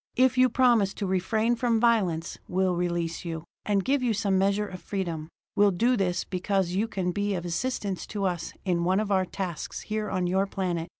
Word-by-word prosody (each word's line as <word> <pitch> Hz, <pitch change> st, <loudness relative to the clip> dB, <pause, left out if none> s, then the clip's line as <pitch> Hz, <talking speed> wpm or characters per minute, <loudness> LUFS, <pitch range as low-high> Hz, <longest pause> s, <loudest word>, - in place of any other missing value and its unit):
"If 260 Hz, +1 st, +4 dB
you 255 Hz, 0 st, +5 dB
promise 235 Hz, -6 st, +3 dB
to 200 Hz, -, -3 dB
refrain 215 Hz, +5 st, +1 dB
from 235 Hz, -1 st, +1 dB
violence, 195 Hz, -9 st, +1 dB
we'll 185 Hz, 0 st, +1 dB
release 170 Hz, -1 st, -2 dB
you, 165 Hz, -2 st, -4 dB, 0.2 s
and 200 Hz, -2 st, +1 dB
give 280 Hz, 0 st, +2 dB
you 240 Hz, -3 st, +1 dB
some 200 Hz, -2 st, +1 dB
measure 200 Hz, +2 st, +2 dB
of 185 Hz, -3 st, -8 dB
freedom. 170 Hz, -6 st, -3 dB, 0.3 s
We'll 205 Hz, 0 st, +5 dB
do 235 Hz, +7 st, +2 dB
this 185 Hz, -5 st, 0 dB
because 190 Hz, -1 st, -1 dB
you 200 Hz, +5 st, 0 dB
can 185 Hz, -4 st, -2 dB
be 205 Hz, +2 st, -1 dB
of 175 Hz, -1 st, -4 dB
assistance 195 Hz, +1 st, -2 dB
to 205 Hz, -2 st, -4 dB
us 175 Hz, -3 st, -2 dB
in 175 Hz, -2 st, +1 dB
one 185 Hz, +3 st, +2 dB
of 215 Hz, -1 st, -2 dB
our 190 Hz, -1 st, +3 dB
tasks 180 Hz, -3 st, -5 dB
here 215 Hz, -1 st, -3 dB
on 185 Hz, -1 st, 0 dB
your 190 Hz, +2 st, +1 dB
planet." 175 Hz, -4 st, -2 dB
195 Hz, 200 wpm, -27 LUFS, 180-215 Hz, 0.3 s, you